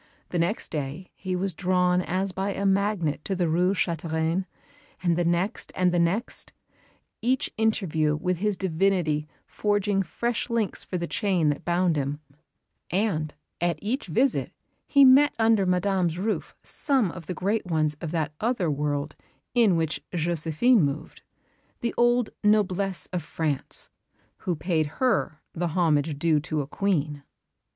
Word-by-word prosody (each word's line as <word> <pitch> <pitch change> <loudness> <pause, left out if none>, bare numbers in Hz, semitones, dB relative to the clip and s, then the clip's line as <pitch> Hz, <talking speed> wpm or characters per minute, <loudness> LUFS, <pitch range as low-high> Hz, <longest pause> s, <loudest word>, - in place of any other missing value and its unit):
The 175 - -1
next 170 +7 0
day 150 +5 -4
he 185 -1 -4
was 190 +1 -1
drawn 180 +1 +2
as 185 +2 -1
by 195 +2 -2
a 200 - -2
magnet 195 -6 +1
to 195 - -1
the 180 -2 +1
Rue 180 +4 +2
Chantereine, 165 +1 -1 0.6
and 170 -2 +3
the 175 - +1
next 175 +6 0
and 180 -1 +3
the 175 - +1
next, 180 +8 0 0.7
each 250 +3 +1
interview 165 -9 +1
with 180 +3 -1
his 205 +1 0
divinity 170 -4 +1 0.2
forging 205 -1 0
fresh 235 +7 -2
links 230 -3 -1
for 180 - -4
the 170 - -2
chain 180 -5 +1
that 145 - -2
bound 175 -2 +2
him; 140 +1 -2 0.7
and 175 -6 0 0.3
at 175 0 +1
each 225 +4 -2
visit 245 - +1 0.4
he 280 -2 +6
met 275 +3 +6
under 225 -4 +3
Madame's 180 -2 +1
roof 210 +4 -2
some 260 - 0
of 170 -2 -10
the 180 - -3
great 200 +3 -1
ones 155 -3 +1
of 165 - -3
that 160 -2 -2
other 215 -8 0
world 145 +1 -2 0.4
in 230 -7 +4
which 160 -1 -1
Josephine 170 - +2
moved, 145 0 -3 0.6
the 235 - -1
old 240 -1 +3
noblesse 200 -3 +2
of 180 - -1
France 155 -2 -2 0.5
who 180 - -2
paid 160 -1 0
her 225 - +1
the 175 +1 -1
homage 155 -3 +1
due 155 0 +3
to 155 +1 -2
a - - -4
Queen. 150 -3 -1
180 Hz, 150 wpm, -26 LUFS, 160-200 Hz, 0.7 s, he